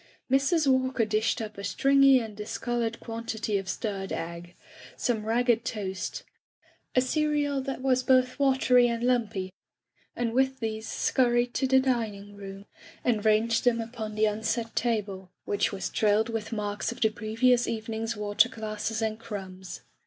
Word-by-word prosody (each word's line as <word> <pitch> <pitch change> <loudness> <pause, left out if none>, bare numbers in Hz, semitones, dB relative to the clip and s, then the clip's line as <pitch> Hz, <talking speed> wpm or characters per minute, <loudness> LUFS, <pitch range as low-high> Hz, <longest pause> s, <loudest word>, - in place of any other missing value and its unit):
Mrs. 285 +4 +3
Walker 260 -3 +2
dished 220 +1 0
up 215 -2 -8
a - - -6
stringy 275 +2 +5
and 220 -3 -6
discolored 230 +2 -3
quantity 225 -2 -3
of 190 -2 -7
stirred 195 0 -3
egg, 170 +1 -6 0.4
some 220 -3 -1
ragged 235 0 +2
toast, 200 -5 -4 0.7
a 255 - +5
cereal 290 0 0
that 265 -1 -5
was 255 -1 +3
both 255 0 +2
watery 260 -3 +4
and 235 0 -2
lumpy, 220 -7 0 0.6
and 235 -1 -1
with 265 +1 +1
these 220 -1 -4
scur 245 -2 +1
ried 240 0 +1
to 265 - 0
the 265 0 +5
dining 220 -6 -2
room, 195 0 -9 0.4
and 220 -4 +1
ranged 225 +1 +3
them 240 -2 +3
upon 225 -2 -5
the 215 0 +3
unset 225 +2 -2
table, 205 -5 -1 0.2
which 205 +2 0
was 195 -2 -3
trailed 215 +1 +2
with 225 -2 -4
marks 205 -1 -2
of 235 - -9
the 220 - +4
previous 230 +3 +2
evening^s 225 0 -3
water 210 +3 +3
glasses 220 -1 -3
and 220 0 -2
crumbs. 190 -5 -7
225 Hz, 155 wpm, -28 LUFS, 210-250 Hz, 0.7 s, stringy